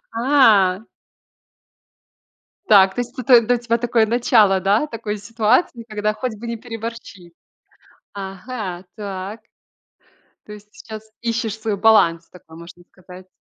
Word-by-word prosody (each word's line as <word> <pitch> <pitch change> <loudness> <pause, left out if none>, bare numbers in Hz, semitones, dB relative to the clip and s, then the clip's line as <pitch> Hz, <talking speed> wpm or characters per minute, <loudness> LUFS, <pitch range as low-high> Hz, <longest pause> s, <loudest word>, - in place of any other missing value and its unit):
А. 225 -7 +3 1.8
Так, 190 -2 +6
то - - -2
есть, 245 +3 -13
это 245 -1 +5
для 245 +2 +1
тебя 235 -1 -1
такое 235 -1 +1
начало, 220 -4 +3
да, 205 +9 +1
такой 220 -5 -5
ситуации, 230 - 0
когда 215 0 -2
хоть 250 0 -4
бы 235 - -8
не 235 0 -4
переборщи. 225 -6 -9 0.8
Ага, 195 -1 -7
так. 200 +1 -7 1.1
То 210 - -10
есть, 210 0 -14
сейчас, 220 -1 -11
ищешь 230 -2 -3
свой 215 -2 -3
баланс 170 -6 +3
такой, 160 -3 -16
можно 170 +1 -13
сказать. 185 0 -15
215 Hz, 125 wpm, -20 LUFS, 195-235 Hz, 1.8 s, Так